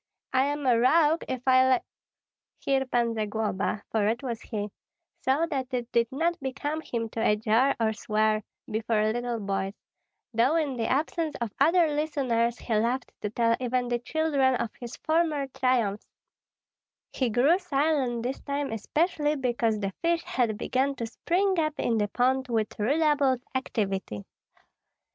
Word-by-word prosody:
I 260 +1 +4
am 290 0 -2
a 240 -3 +4
rogue 310 +5 +4
if 255 -1 -4
I 260 0 +6
li - - -1 0.4
" - - -65
Here 270 -1 +1
Pan 240 -2 +1
Zagloba 215 -2 -2
for 215 -2 +2
it 235 +4 -1
was 235 -3 -4
he 210 -3 -4 0.5
saw 275 +5 +2
that 270 -5 -3
it 245 -1 -4
did 235 -1 +2
not 335 +5 0
become 290 +3 -3
him 230 -6 -3
to 225 - -6
adjure 225 +5 +3
or 220 -1 +1
swear 215 +1 +1 0.2
before 215 0 0
little 240 -1 -2
boys, 195 -1 -2 0.6
though 240 +7 +3
in 300 -5 0
the 230 -2 -1
absence 310 +3 -1
of 235 -3 -3
other 335 +5 +5
listeners 270 -6 0
he 230 - -4
loved 235 +4 0
to 210 - -2
tell 230 +1 +2
even 250 -1 -1
the 240 0 0
children 280 -1 +1
of 235 -2 -2
his 240 -2 -7
former 315 -3 +1
triumphs; 245 -6 0 1.0
he 255 -3 0
grew 275 - +4
silent 275 -8 0
this 255 +2 -3
time 280 -2 -3
especially 300 - 0
because 240 -5 0
the 195 -2 -3
fish 335 0 +1
had 230 -4 0
begun 270 +5 0
to 235 - -4
spring 365 - 0
up 310 -1 0
in 230 -2 +1
the 205 - +1
pond 260 +4 +1
with 220 -4 -2
redoubled 280 +1 +2
activity. 195 - -2
250 Hz, 160 wpm, -27 LUFS, 225-290 Hz, 1.0 s, I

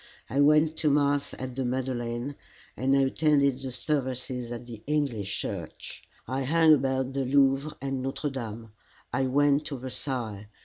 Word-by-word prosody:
I 135 - +1
went 150 +2 +5
to 155 - +2
mass 145 -1 +2
at 130 -1 -6
the 135 - -1
Madeleine, 125 0 -2 0.4
and 135 +2 +2
I - - +4
attended 140 -1 +2
the 135 - -4
services 125 -2 -2
at 120 0 -6
the 115 -3 -9
English 135 -10 -1
Church. - - -6 0.3
I 130 +3 -1
hung 160 +3 +5
about 130 -2 +1
the 135 0 0
Louvre 135 +2 +2
and 135 -1 -3
Notre 135 +2 -2
Dame. 115 -4 -6 0.4
I 135 -1 +1
went 145 +2 +3
to 140 - -4
Versailles. 120 -5 -4
135 Hz, 160 wpm, -28 LUFS, 125-145 Hz, 0.4 s, went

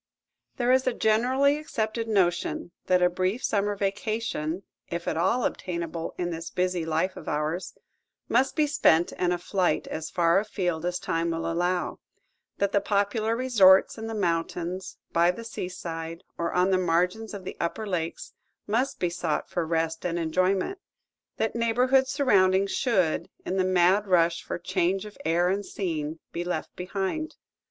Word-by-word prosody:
There 245 0 +1
is 260 0 +3
a 250 - +1
generally 260 +7 +3
accepted 225 -6 -2
notion 175 -4 0 0.2
that 180 -1 +4
a - - +7
brief 185 +6 -1
summer 205 0 +1
vacation, 200 -4 -2 0.3
if 170 0 -4
at - - 0
all 190 +9 +2
obtainable 170 -2 -3
in 175 -1 -2
this 165 0 -5
busy 180 -2 -1
life 165 +4 0
of - - -10
ours, 155 +4 -2 0.5
must 260 +3 +2
be 305 - +3
spent 175 - +3
in 180 -1 0
a 175 - +1
flight 175 -2 0
as 155 0 -5
far 170 +1 +3
afield 180 -5 -2
as 180 0 -1
time 165 -1 -1
will 165 0 -2
allow; 175 +2 -1 0.6
that 200 0 +1
the 200 - +2
popular 205 +2 +1
resorts 210 -7 +5
in 225 - -5
the 225 - -4
mountains, 175 0 -2 0.2
by 170 +1 +4
the 180 +6 -3
seaside, 170 -5 -6
or 170 0 -2
on 180 +2 +2
the 185 - +3
margins 180 +5 0
of 195 - -7
the - - -6
upper 190 +6 -2
lakes 170 -5 -3 0.3
must 235 +6 0
be 175 -1 0
sought 170 -3 -2
for 170 -2 -1
rest 165 0 -1
and 175 -1 -1
enjoyment; 185 - 0 0.6
that 220 - 0
neighborhood 250 +3 +3
surroundings 200 -8 +3
should, 195 -11 +1 0.2
in 190 - -2
the 185 - +3
mad 185 +2 +3
rush 170 -2 +3
for - - -4
change 185 +2 0
of 210 - -10
air 170 +2 +3
and 200 +2 0
scene, 160 -6 -3
be 170 - -3
left 180 0 -4
behind. 195 - -3
185 Hz, 165 wpm, -27 LUFS, 170-215 Hz, 0.6 s, a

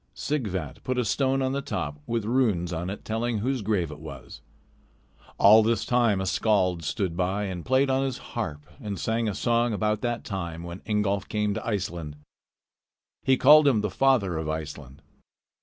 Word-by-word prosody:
Sighvat 100 - -3
put 130 0 -2
a 125 - +1
stone 135 +5 +1
on 130 - 0
the 140 +1 -1
top, 80 - -4
with 115 -2 -1
runes 105 -8 +1
on 85 +2 -3
it 100 - -7
telling 115 +1 -1
whose 125 +4 -1
grave 95 -6 0
it 75 - -9
was. 80 +1 -10 1.0
All 110 +3 +8
this 115 +1 +1
time 120 -5 +2
a 95 - -2
skald 95 -3 +1
stood 90 +2 -2
by 95 +3 -1
and 95 -4 -4
played 130 +2 +2
on 135 +1 +2
his 135 -2 -2 0.2
harp 75 0 -4 0.2
and 100 -5 -5
sang 115 0 0
a 100 - -4
song 120 -1 +1
about 105 0 0
that 120 -1 -2
time 85 -4 -5
when 85 +2 -8
Ingolf 105 -2 0
came 105 -1 0
to - - -4
Iceland. 85 -8 -3 1.1
He 130 0 +3
called 150 +3 +7
him 120 -6 +3
the 105 -2 -2
father 110 -11 +2
of 80 -1 -4
Iceland. 75 -4 -6
105 Hz, 180 wpm, -26 LUFS, 90-120 Hz, 1.1 s, All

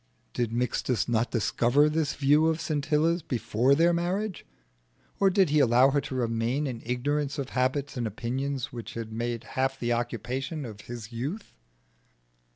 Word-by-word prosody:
Did 120 -2 -1
Mixtus 125 0 0
not 120 0 +1
discover 120 +5 +3
this 150 -1 0
view 145 +3 +4
of 160 0 +1
Scintilla's 155 +3 +1
before 125 0 +1
their 170 +3 +4
marriage? 185 +4 -2 0.7
Or 195 - +5
did 190 -5 +3
he 150 - +4
allow 130 0 +5
her 145 +1 +2
to 130 - -6
remain 120 +3 0
in 125 -4 -4
ignorance 140 +4 -1
of 140 -3 -3
habits 130 +2 -1
and 120 -2 -1
opinions 130 +5 -3
which 120 -2 -7
had 115 -1 -5
made 120 +1 -3
half 135 +1 -2
the 120 0 0
occupation 130 +5 -3
of 105 -3 -9
his 120 -1 -8
youth? 140 - -5
130 Hz, 160 wpm, -28 LUFS, 120-150 Hz, 0.7 s, Or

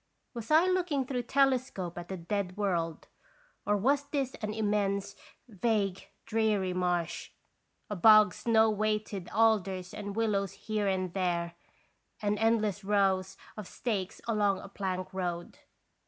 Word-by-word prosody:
Was 235 -3 -7
I 315 +3 +6
looking 355 -7 +1
through 250 -1 -2
telescope 255 -9 +1
at 175 +1 -7
a 190 - -3
dead 185 +1 -3
world, 170 -5 -1 0.6
or 205 - +3
was 280 +7 +2
this 280 -2 -2
an 215 -1 -2
immense, 200 -2 -1 0.3
vague, 205 -3 -1 0.2
dreary 215 -4 +1
marsh? 175 -2 -1 0.6
A 210 - -4
bog, 215 +2 +7
snow 225 -1 +3
weighted 210 -2 -2
alders 195 -4 +1
and 205 -1 -6
willows 205 -4 0
here 215 -2 -2
and 185 -2 -1
there, 175 -3 -1 0.7
and 205 -1 0
endless 215 -3 +1
rows 195 -1 +1 0.2
of 215 -4 -7
stakes 200 -6 -3
along 205 -3 +2
a - - -9
plank 190 -1 -4
road. 175 -2 -4
205 Hz, 135 wpm, -30 LUFS, 185-225 Hz, 0.7 s, bog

